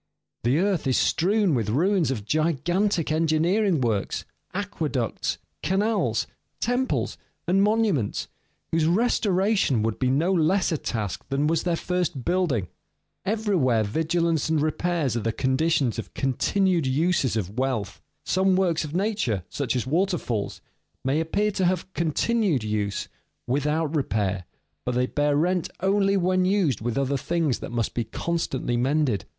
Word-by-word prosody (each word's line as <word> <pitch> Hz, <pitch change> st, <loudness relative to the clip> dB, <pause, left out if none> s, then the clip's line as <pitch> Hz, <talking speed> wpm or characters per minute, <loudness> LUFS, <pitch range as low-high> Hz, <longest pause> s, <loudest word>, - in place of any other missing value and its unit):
The 125 Hz, +5 st, +2 dB
earth 185 Hz, -4 st, +1 dB
is 130 Hz, -, +2 dB
strewn 195 Hz, +1 st, +2 dB
with 115 Hz, -5 st, 0 dB
ruins 170 Hz, -, +2 dB
of 110 Hz, -7 st, -3 dB
gigantic 170 Hz, -, +1 dB
engineering 165 Hz, +4 st, +2 dB
works, 110 Hz, -5 st, -1 dB, 0.3 s
aqueducts, 155 Hz, -, -2 dB, 0.2 s
canals, 205 Hz, +6 st, +1 dB, 0.3 s
temples, 245 Hz, +2 st, -1 dB, 0.3 s
and 190 Hz, +3 st, +3 dB
monuments, 205 Hz, -, +1 dB, 0.4 s
whose 160 Hz, -1 st, +2 dB
restoration 195 Hz, -, +2 dB
would 110 Hz, -1 st, -1 dB
be 130 Hz, -, +1 dB
no 160 Hz, +8 st, +2 dB
less 180 Hz, +3 st, +2 dB
a 160 Hz, -, 0 dB
task 105 Hz, -5 st, -3 dB
than 140 Hz, +2 st, +1 dB
was 160 Hz, +1 st, +2 dB
their 175 Hz, -2 st, 0 dB
first 175 Hz, -7 st, -2 dB
building. 170 Hz, -, +1 dB, 0.6 s
Everywhere 185 Hz, -, +2 dB
vigilance 160 Hz, +6 st, 0 dB
and 160 Hz, -1 st, +2 dB
repairs 155 Hz, -3 st, 0 dB
are -, -, +1 dB
the 115 Hz, -, 0 dB
conditions 130 Hz, +2 st, +1 dB
of -, -, -8 dB
continued 170 Hz, +5 st, +1 dB
uses 140 Hz, -3 st, +1 dB
of 105 Hz, +3 st, -3 dB
wealth. 120 Hz, -7 st, -2 dB, 0.2 s
Some 190 Hz, 0 st, +2 dB
works 175 Hz, -4 st, +1 dB
of 155 Hz, +1 st, -6 dB
nature, 190 Hz, -, 0 dB
such 140 Hz, -3 st, -2 dB
as 125 Hz, -, -1 dB
waterfalls, 155 Hz, -, -1 dB, 0.4 s
may 135 Hz, +4 st, +2 dB
appear 205 Hz, +6 st, 0 dB
to 190 Hz, -2 st, 0 dB
have 180 Hz, -1 st, +1 dB
a 190 Hz, -, -34 dB
continued 170 Hz, -, +1 dB
use 105 Hz, -2 st, -2 dB, 0.4 s
without 150 Hz, +4 st, 0 dB
repair, 100 Hz, -, -1 dB, 0.4 s
but 125 Hz, -, -2 dB
they 125 Hz, 0 st, +2 dB
bear 145 Hz, +2 st, +1 dB
rent 175 Hz, +2 st, +1 dB
only 195 Hz, +1 st, +2 dB
when 185 Hz, 0 st, +2 dB
used 185 Hz, -, +1 dB
with 120 Hz, +1 st, -2 dB
other 140 Hz, 0 st, +1 dB
things 160 Hz, -2 st, 0 dB
that -, -, -7 dB
must 115 Hz, -2 st, -1 dB
be 120 Hz, -, -1 dB
constantly 135 Hz, -2 st, -2 dB
mended. 130 Hz, -, +1 dB
160 Hz, 145 wpm, -25 LUFS, 130-185 Hz, 0.6 s, and